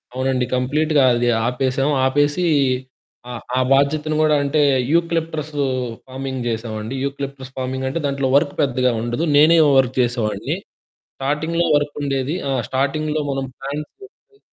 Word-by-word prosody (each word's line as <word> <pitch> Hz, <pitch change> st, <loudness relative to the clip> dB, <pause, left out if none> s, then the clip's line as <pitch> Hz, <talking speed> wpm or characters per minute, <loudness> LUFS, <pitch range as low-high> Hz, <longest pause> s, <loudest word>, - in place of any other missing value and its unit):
అవునండి. 130 Hz, -1 st, 0 dB
కంప్లీట్‌గా 145 Hz, +3 st, +2 dB
అది 120 Hz, 0 st, +1 dB, 0.2 s
ఆపేశాం. 130 Hz, +3 st, 0 dB, 0.2 s
ఆపేసీ, 145 Hz, +5 st, +1 dB, 0.8 s
ఆ -, -, -5 dB, 0.2 s
ఆ -, -, +3 dB
బాధ్యతను 150 Hz, +3 st, +1 dB
గూడా 155 Hz, -1 st, +4 dB
అంటే, 140 Hz, +2 st, +1 dB, 0.3 s
యూకలిప్టసూ 160 Hz, -3 st, 0 dB, 0.4 s
ఫార్మింగ్ 130 Hz, -1 st, -5 dB
జేశామండి. 110 Hz, +1 st, -4 dB
యూకలిప్టస్ 140 Hz, -1 st, -5 dB
ఫార్మింగంటే 130 Hz, +3 st, -2 dB
దాంట్లో 140 Hz, -1 st, 0 dB
వర్కు 145 Hz, 0 st, +2 dB
పెద్దగా 130 Hz, -2 st, +1 dB
ఉండదు. 120 Hz, +6 st, -2 dB
నేనే 155 Hz, +3 st, +6 dB, 0.2 s
వర్క్ 130 Hz, -1 st, +2 dB
జేసేవాడిని. 120 Hz, -3 st, -1 dB, 0.6 s
స్టార్టింగ్‌లో 160 Hz, +5 st, -1 dB
వర్కుండేది. 145 Hz, 0 st, -1 dB
ఆ! -, -, 0 dB, 0.2 s
స్టార్టింగ్‌లో 150 Hz, +3 st, -1 dB
మనం 135 Hz, 0 st, -2 dB
ప్లాంట్స్ 145 Hz, +2 st, -6 dB
తెచ్చి 415 Hz, +1 st, -18 dB
140 Hz, 120 wpm, -20 LUFS, 130-150 Hz, 0.8 s, నేనే